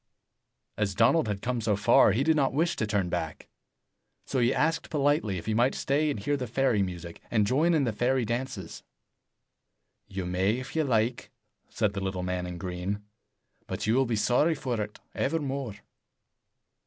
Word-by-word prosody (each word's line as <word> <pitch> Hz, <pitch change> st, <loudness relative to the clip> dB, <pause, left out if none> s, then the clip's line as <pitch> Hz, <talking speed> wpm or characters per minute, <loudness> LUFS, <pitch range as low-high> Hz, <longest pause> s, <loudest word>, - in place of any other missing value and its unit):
As 100 Hz, -3 st, 0 dB
Donald 120 Hz, +7 st, +4 dB
had 100 Hz, -2 st, -3 dB
come 125 Hz, -1 st, -1 dB
so 105 Hz, -2 st, +1 dB
far, 100 Hz, +1 st, +5 dB
he 115 Hz, +7 st, +1 dB
did 160 Hz, +1 st, +3 dB
not 140 Hz, -4 st, +2 dB
wish 165 Hz, +3 st, +1 dB
to 110 Hz, -, -1 dB
turn 100 Hz, -3 st, 0 dB
back. 85 Hz, -3 st, -4 dB, 0.8 s
So 130 Hz, -, -1 dB
he 120 Hz, +1 st, +3 dB
asked 160 Hz, +4 st, 0 dB
politely 145 Hz, -9 st, +1 dB
if 85 Hz, -, -7 dB
he 110 Hz, -, 0 dB
might 120 Hz, +4 st, +2 dB
stay 150 Hz, +3 st, +1 dB
and 140 Hz, -, -2 dB
hear 145 Hz, +9 st, 0 dB
the 130 Hz, -3 st, -3 dB
fairy 125 Hz, -2 st, +2 dB
music, 85 Hz, -3 st, -5 dB
and 110 Hz, -3 st, +2 dB
join 155 Hz, +10 st, +3 dB
in 150 Hz, -, +3 dB
the 115 Hz, -4 st, 0 dB
fairy 125 Hz, +2 st, +1 dB
dances. 115 Hz, -6 st, -4 dB, 1.3 s
"You 95 Hz, -1 st, -4 dB
may 95 Hz, +3 st, +1 dB
if 130 Hz, +3 st, -7 dB
you 160 Hz, -1 st, +2 dB
like," 115 Hz, -1 st, 0 dB, 0.4 s
said 105 Hz, -3 st, 0 dB
the 100 Hz, -, -3 dB
little 95 Hz, -1 st, -2 dB
man 90 Hz, 0 st, -2 dB
in 90 Hz, -1 st, -6 dB
green, 90 Hz, +3 st, -4 dB, 0.6 s
"but -, -, -3 dB
you 110 Hz, -, +2 dB
will 130 Hz, +1 st, +3 dB
be 115 Hz, -, 0 dB
sorry 125 Hz, +9 st, +3 dB
for 125 Hz, -6 st, -2 dB
it 105 Hz, 0 st, -6 dB
evermore." 135 Hz, -6 st, -2 dB
115 Hz, 180 wpm, -28 LUFS, 100-135 Hz, 1.3 s, far